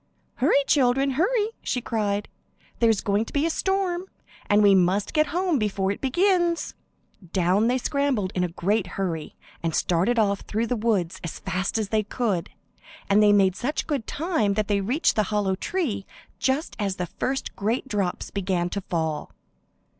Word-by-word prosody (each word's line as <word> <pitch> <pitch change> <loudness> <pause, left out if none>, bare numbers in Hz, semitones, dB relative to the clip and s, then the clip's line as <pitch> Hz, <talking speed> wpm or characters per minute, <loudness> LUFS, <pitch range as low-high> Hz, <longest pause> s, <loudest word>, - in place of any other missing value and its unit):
"Hurry, 280 +1 +3
children, 270 0 +3
hurry," 415 - +1
she 250 - -1
cried. 210 -3 -1 0.5
"There's 225 -3 +3
going 205 +1 +1
to - - -10
be 290 +2 +2
a 330 - +1
storm, 380 0 0 0.4
and 205 +1 +4
we 200 -1 +7
must 190 +2 +2
get 305 -1 +3
home 350 -2 0
before 195 -2 0
it 200 - -5
begins." 345 +4 +1 0.6
Down 190 +4 +3
they 250 +2 +2
scrambled 260 -7 0
in 180 - 0
a - - +1
great 190 +4 0
hurry, 165 -5 -3 0.3
and 165 -2 -1
started 185 +8 +1
off 200 -3 +2
through 220 +2 -2
the 245 - -1
woods 210 -7 0
as 170 - -5
fast 185 +4 -2
as 215 -3 -2
they 220 0 +2
could, 205 -4 -2 0.6
and 205 +2 +6
they 210 -1 +6
made 195 -2 +4
such 285 +9 -2
good 280 -8 -2
time 290 - 0
that 215 -1 0
they 200 -1 +1
reached 250 - +1
the 215 - +3
hollow 205 -3 +1
tree 235 - -2 0.3
just 265 +5 0
as 200 -2 -1
the 180 - -2
first 265 +9 -3
great 225 +6 -1
drops 200 -7 -2
began 180 -3 -1
to 200 - -2
fall. 160 -4 -3
215 Hz, 175 wpm, -25 LUFS, 195-275 Hz, 0.6 s, we